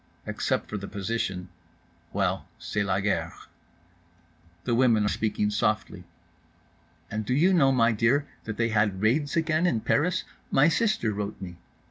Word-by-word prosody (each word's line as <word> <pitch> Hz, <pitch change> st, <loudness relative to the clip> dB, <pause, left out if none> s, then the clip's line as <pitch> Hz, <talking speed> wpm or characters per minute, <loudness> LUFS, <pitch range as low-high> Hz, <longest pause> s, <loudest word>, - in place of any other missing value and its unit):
Except -, -, -1 dB
for 105 Hz, -, -4 dB
the 100 Hz, -, -7 dB
position—well, 90 Hz, -5 st, -4 dB
c'est 105 Hz, -, -3 dB
la 100 Hz, -1 st, +1 dB
guerre. 105 Hz, +1 st, -1 dB, 1.3 s
The 120 Hz, -, 0 dB
women 115 Hz, -3 st, +4 dB
are -, -, +2 dB
speaking 105 Hz, -1 st, 0 dB
softly. 105 Hz, -1 st, -1 dB, 1.1 s
"And 110 Hz, 0 st, -2 dB
do 125 Hz, +5 st, -1 dB
you 180 Hz, +7 st, +4 dB
know, 140 Hz, -7 st, +5 dB
my 120 Hz, -3 st, +4 dB
dear, 120 Hz, +7 st, +2 dB, 0.2 s
that 110 Hz, -1 st, -5 dB
they 115 Hz, -1 st, +1 dB
had 105 Hz, -3 st, +1 dB
raids 140 Hz, +7 st, +1 dB
again 165 Hz, +1 st, +2 dB
in 115 Hz, -10 st, +1 dB
Paris? 170 Hz, +9 st, +1 dB, 0.3 s
My 145 Hz, +4 st, +5 dB
sister 210 Hz, -, +1 dB
wrote 105 Hz, +1 st, -4 dB
me." 90 Hz, -3 st, -8 dB
110 Hz, 145 wpm, -27 LUFS, 105-135 Hz, 1.3 s, know